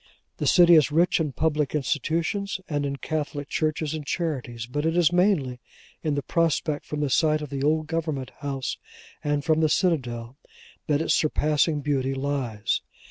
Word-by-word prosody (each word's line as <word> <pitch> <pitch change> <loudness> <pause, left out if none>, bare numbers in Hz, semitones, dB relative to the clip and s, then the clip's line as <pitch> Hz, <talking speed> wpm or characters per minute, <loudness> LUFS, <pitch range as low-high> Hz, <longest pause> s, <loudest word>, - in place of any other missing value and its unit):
The - - -1
city 175 -1 +7
is 155 -2 +5
rich 170 +4 +3
in 155 -3 -1
public 150 -1 0
institutions 165 - -1
and 145 -2 -1
in 140 - -3
Catholic 145 -1 -4
churches 155 -1 -1
and 155 -1 -4
charities, 135 -8 -3
but 145 +5 -3
it 165 +2 +1
is 175 0 +4
mainly 175 -10 +2 0.4
in 155 -3 -1
the 145 - -2
prospect 160 -3 0
from 150 0 -3
the 145 - 0
site 155 +1 +3
of 150 - -8
the 135 -1 -3
Old 155 +2 +2
Government 155 -5 -3
House, 135 -3 -3 0.4
and 145 -1 0
from 160 -1 +3
the 155 -1 +3
Citadel, 125 -9 0 0.5
that 150 -1 +2
its - - +2
surpassing 150 0 +1
beauty 135 -2 0
lies. 135 -6 -1
150 Hz, 170 wpm, -25 LUFS, 140-160 Hz, 0.5 s, city